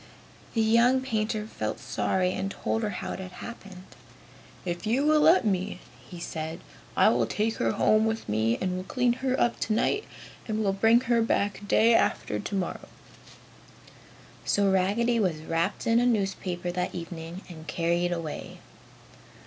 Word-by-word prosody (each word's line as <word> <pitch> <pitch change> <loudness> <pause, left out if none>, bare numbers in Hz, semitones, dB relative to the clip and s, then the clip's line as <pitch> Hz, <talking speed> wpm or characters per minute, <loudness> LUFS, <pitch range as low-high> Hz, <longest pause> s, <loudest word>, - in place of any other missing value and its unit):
The 225 - +3
young 235 +4 +4
painter 215 -4 -1
felt 220 - -4
sorry 185 -1 0
and 195 +1 -2
told 225 +3 -2
her 215 - -1
how 180 - -5
it - - -6
had 185 -1 -8
happened. 195 -6 -9 0.8
"If 175 +3 -3
you 255 +6 +2
will 305 0 +5
let 325 -2 +5
me," 195 -1 -1 0.3
he 175 - -9
said, 160 0 -5 0.4
"I - - +6
will - - +2
take 220 +2 -1
her 115 -1 +1
home 215 0 +3
with 225 0 -2
me 110 +2 +1
and 185 -1 -1
will 185 - -4
clean 245 +4 +1
her 260 -1 0
up 240 - +1
tonight 240 - 0 0.4
and 215 -1 -1
will 195 -1 +1
bring 225 +4 +4
her 240 -2 +2
back 205 -2 0
day 230 +3 +5
after 105 - +1
tomorrow." 190 - -3 1.6
So 200 -1 +2
Raggedy 215 +6 +2
was 170 -7 0
wrapped 165 +4 -1
in 230 +1 +4
a 245 - +3
newspaper 190 -5 -1
that 180 0 -3
evening 170 +1 -7
and 160 -3 -11
carried 170 +2 0
away. 165 -3 -5
200 Hz, 160 wpm, -27 LUFS, 175-230 Hz, 1.6 s, I